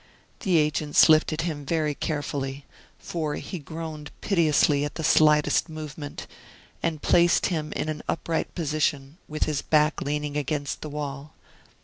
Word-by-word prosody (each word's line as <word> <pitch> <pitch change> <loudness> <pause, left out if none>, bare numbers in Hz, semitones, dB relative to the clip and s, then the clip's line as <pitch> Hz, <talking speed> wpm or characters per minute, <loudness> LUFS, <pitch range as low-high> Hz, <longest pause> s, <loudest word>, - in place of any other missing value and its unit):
The 185 -6 +2
agents 150 0 +4
lifted 155 0 +4
him 155 -4 -3
very 155 0 0
carefully 140 -2 -3 0.3
for 155 -3 -3
he 185 - -6
groaned 155 0 -7
piteously 155 -6 +3
at 145 - -4
the 160 - -4
slightest 150 +1 +4
movement 150 -2 -7 0.6
and 160 -3 -2
placed 175 0 +4
him 155 -2 -3
in - - -2
an 155 -1 -3
upright 165 0 -2
position, 150 -2 -1
with 155 0 -2
his 150 -2 -1
back 155 0 +2
leaning 150 0 -2
against 145 0 -2
the 155 - -5
wall. 145 0 -6
150 Hz, 140 wpm, -26 LUFS, 145-160 Hz, 0.6 s, agents